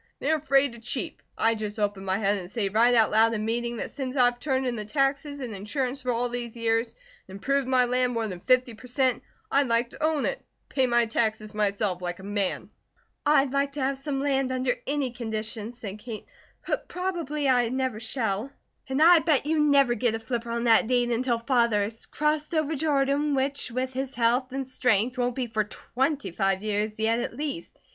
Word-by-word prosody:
They 290 - -1
are 315 - +3
afraid 275 -3 +2
to 235 - -11
cheep. 255 +7 -4 0.2
I 225 0 +3
just 215 -1 -5
open 205 -2 -1
my 190 0 0
head 205 -1 +1
and 180 -1 -8
say 210 -2 -1
right 235 +4 +4
out 225 -2 +4
loud 225 +1 +4
in 215 0 -2
meeting 235 +1 -1
that - - -4
since 265 -2 -5
I've 245 -2 +3
turned 265 -1 0
in 245 -1 -1
the 215 - -4
taxes 275 +4 -1
and 240 -4 -5
insurance 255 +7 -3
for 250 -1 -1
all 240 +1 0
these 240 -1 -5
years 230 0 0 0.3
and 190 - -10
improved 275 +6 0
my 255 -1 +4
land 250 0 +1
more 230 -1 -1
than 185 -4 -6
fifty 255 +3 +2
per 225 +3 -13
cent., 255 -1 +1 0.3
I'd 280 -1 +3
like 235 +1 +1
to - - -8
own 310 -2 +1
it, - - -1
and - - -41
pay 265 -2 +2
my 240 -1 +3
taxes 220 -1 -1
myself, 205 -3 0
like 175 -1 -3
a 190 - -12
man." 200 -1 -2 0.6
"I'd 280 -3 +4
like 280 0 0
to 290 - -4
have 270 +1 +1
some 275 -1 -2
land 270 -2 +1
under 255 -1 +1
any 280 -2 0
conditions," 225 -1 -5
said 210 -4 -7
Kate, 220 -1 -7 0.4
"but - - -2
probably 340 -6 -2
I 245 -3 +3
never 260 -3 -1
shall. 225 0 -2 0.4
And 265 +3 +2
I 345 0 +8
bet 310 -4 +2
you 315 +1 +1
never 280 -4 +4
get 240 -2 0
a - - -3
flipper 235 0 -4
on 235 0 -2
that 225 -2 +5
deed 245 -1 +2
until 240 0 +1
Father 235 -3 +2
has 220 +2 -5
crossed 300 +1 -1
over 310 0 +1
Jordan, 285 0 +1
which 275 +1 0
with 255 +2 -3
his 265 +1 -4
health 245 +2 +1
and 270 0 -3
strength 250 -1 +1
won't 245 0 0
be 260 - -1
for 220 -2 0
twenty 265 - -2
five 195 +2 0
years 215 0 -1
yet 225 +1 +2
at 235 - -4
least. 295 +4 -4
245 Hz, 215 wpm, -26 LUFS, 220-275 Hz, 0.6 s, I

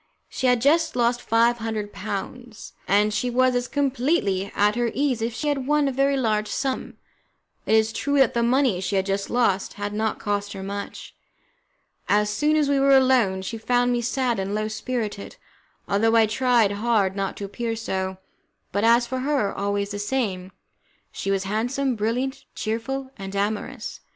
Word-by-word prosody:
She 260 - -1
had 250 -2 +3
just 305 +4 +3
lost 240 0 +1
five 235 +1 +2
hundred 220 -2 -4
pounds, 235 +3 -6
and 210 +2 +3
she 250 +4 0
was 255 +1 +3
as 245 0 -1
completely 260 - 0
at 210 +1 +3
her 240 -1 +1
ease 265 -4 0
as 225 - +1
if 235 - -7
she 300 - -3
had 275 -3 -1
won 295 -1 +3
a - - 0
very 275 +1 +1
large 215 -4 0
sum. 265 +2 -3 0.7
It 220 - +4
is 220 0 +2
true 285 0 0
that 270 -3 +4
the 235 - +1
money 240 -5 +2
she 195 - -2
had 190 0 +1
just 195 0 -2
lost 230 -6 +1
had 205 0 -4
not 220 +1 -1
cost 205 0 -2
her 195 -1 -7
much. 200 +1 -6 1.0
As 210 0 +3
soon 295 +9 +1
as 300 -2 +2
we 280 -1 +2
were 275 0 +6
alone, 245 -8 +3
she 225 +4 -5
found 245 +2 +2
me 240 -1 +1
sad 240 -1 0
and 195 +2 -2
low 215 0 -1
spirited, 215 -2 -4 0.5
although 225 +3 +2
I 225 -1 +6
tried 235 -1 +2
hard 205 -2 +1
not 195 -1 -3
to 200 - -5
appear 225 +3 -3
so, 190 -4 -3 0.5
but, 200 +2 -1
as 235 +1 +5
for 260 +2 -3
her, 270 -6 0
always 200 0 -2
the 205 - -4
same, 205 -5 -2 0.6
she 195 - -4
was 195 -1 +1
handsome, 245 +6 -1
brilliant, 235 +5 -2
cheerful, 260 +5 -3
and 195 -1 -7
amorous. 215 +4 -3
230 Hz, 185 wpm, -24 LUFS, 205-255 Hz, 1.0 s, were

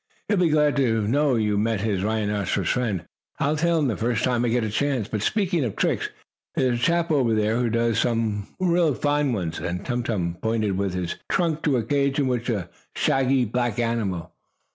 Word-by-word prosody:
He'll 205 - +2
be 175 -2 +3
glad 150 -1 +3
to 115 -6 +1
know 140 +2 +2
you 105 -2 +1
met 110 -1 0
his 100 -3 -1
rhinoceros 105 -1 0
friend. 105 -9 -1 0.3
I'll 145 +2 +1
tell 170 +2 +2
him 150 -3 +2
the 115 - 0
first 115 -1 -1
time 125 -2 +1
I 120 - +1
get 120 0 +1
a 110 - -2
chance. 130 -2 0
But, 105 -2 -3
speaking 180 - +1
of 115 -5 -3
tricks, - - 0 0.5
there's 125 -2 +1
a - - -8
chap 170 +3 +2
over 125 -7 +2
there 110 +1 +1
who 120 -1 +1
does 115 0 +1
some 115 -4 0 0.5
fine 145 -1 +1
ones," 90 -7 -2
and 90 +1 -4
Tum 120 -1 -1
Tum 90 -7 -2
pointed 110 -3 0
with 95 -1 -1
his 90 -2 -3
trunk 165 -4 0
to 140 -4 +3
a 115 - 0
cage 140 +3 +1
in 145 - +2
which 125 -1 -1
was 105 -6 0
a 85 - -19 0.3
shaggy, 135 -1 +2
black 120 0 -1
animal. 110 -8 -2
115 Hz, 210 wpm, -24 LUFS, 105-140 Hz, 0.5 s, be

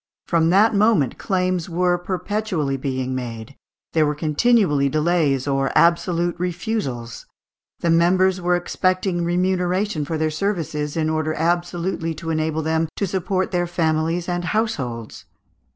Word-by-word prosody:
From 165 -1 +2
that 205 +6 +4
moment 200 - +2
claims 185 -2 -1
were 180 +1 +2
perpetually 185 -4 -2
being 130 -1 -3
made; 120 0 -6 0.4
there 160 - +4
were 150 0 0
continually 150 -2 +2
delays, 150 -3 +1
or 135 -1 0
absolute 170 0 +3
refusals; 165 - -3 0.5
the 170 - +2
members 185 +3 +3
were 175 0 +2
expecting 185 0 0
"remuneration 180 0 0
for 160 +2 -3
their 155 0 0
services, 155 -4 -2
in 155 -1 +1
order 155 0 -1
absolutely 175 0 -1
to 165 +2 -5
enable 155 0 -1
them 160 +1 0
to 200 - -1
support 190 0 -1
their 175 -1 0
families 165 0 0
and 175 -1 -2
households." 135 - -3
170 Hz, 135 wpm, -22 LUFS, 155-185 Hz, 0.5 s, that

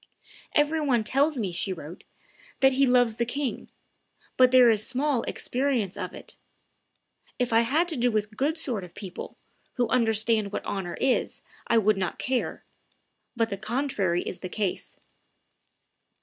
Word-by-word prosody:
"Every 300 +1 +3
one 250 -6 +2
tells 280 +6 +1
me," 205 -6 -2
she 180 +3 -2
wrote, 170 0 -8 0.6
"that 265 0 +6
he 270 +1 +3
loves 245 -3 +3
the 235 - +1
king; 270 +2 -3 0.7
but 255 -1 +6
there 255 -1 +7
is 215 -1 +1
small 265 -1 0
experience 250 -7 -1
of - - -5
it.... - - -13 1.0
If 245 -2 -1
I 225 - +6
had 295 +9 +1
to 325 - -1
do 245 -1 +2
with 215 -1 -2
good 290 +8 0
sort 245 - -2
of 175 - -12
people, 190 -4 -8 0.4
who 245 -2 +1
understand 225 -3 +2
what - - -4
honor 185 -3 -4
is, 260 -1 0 0.3
I 230 - +3
would 215 -1 +3
not 185 -1 -2
care; 255 -1 -2 0.7
but 230 -1 +1
the 200 - -4
contrary 215 -5 -1
is - - -6
the 185 - -6
case." 200 -3 -3
235 Hz, 160 wpm, -26 LUFS, 205-265 Hz, 1.0 s, there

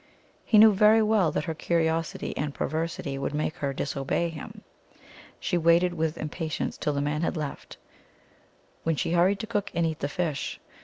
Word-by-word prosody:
He 215 - +3
knew 215 0 +8
very 215 +3 +5
well 210 -7 +3
that - - -1
her 160 - -3
curiosity 165 0 -1
and 145 0 -3
perversity 155 -4 -3
would 140 +1 -2
make 155 +1 -2
her 140 -1 -1
disobey 140 +4 -1
him. 160 -2 -9 0.8
She 175 - 0
waited 170 +2 +4
with 160 -1 -1
impa 160 +2 -4
tience - - -3
till 150 - 0
the 140 - -1
man 150 +2 -1
had 170 - -1
left, 150 -2 -6 1.0
when 165 -1 0
she 155 - -1
hurried 180 +4 +3
to - - -4
cook 205 -3 -2
and 170 - +2
eat 160 -1 -2
the 145 - -2
fish. 160 -3 -3
165 Hz, 185 wpm, -27 LUFS, 150-180 Hz, 1.0 s, knew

